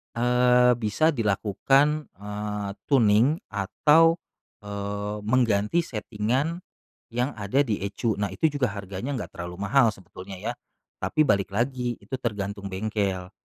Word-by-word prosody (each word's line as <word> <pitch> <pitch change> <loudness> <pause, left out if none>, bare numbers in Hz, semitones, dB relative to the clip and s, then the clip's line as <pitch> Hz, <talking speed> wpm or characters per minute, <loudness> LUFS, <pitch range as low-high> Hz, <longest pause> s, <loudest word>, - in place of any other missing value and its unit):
eee, 125 +1 +4
bisa 115 +9 +2
dilakukan, 135 - +1
eee, 105 +1 -4 0.2
tuning 120 +2 +4 0.2
atau, 150 +11 +4 0.5
eee, 100 0 -4
mengganti 115 +4 +2
setting-an 125 +8 -2 0.5
yang 125 +3 -1
ada 105 +8 +2
di 110 -5 -1
ECU, 105 +3 -1
nah 100 - +1
itu 125 +12 +1
juga 140 -3 +1
harganya 100 +7 -5
enggak - - -6
terlalu 90 +3 -6
mahal 125 +2 +5
sebetulnya 95 +1 -10
ya, 115 +5 -3 0.5
tapi 155 - +2
balik 100 -7 +2
lagi 125 +1 -1
itu 135 - -15
tergantung 100 -3 -3
bengkel. 95 -2 -2
110 Hz, 125 wpm, -26 LUFS, 100-130 Hz, 0.5 s, mahal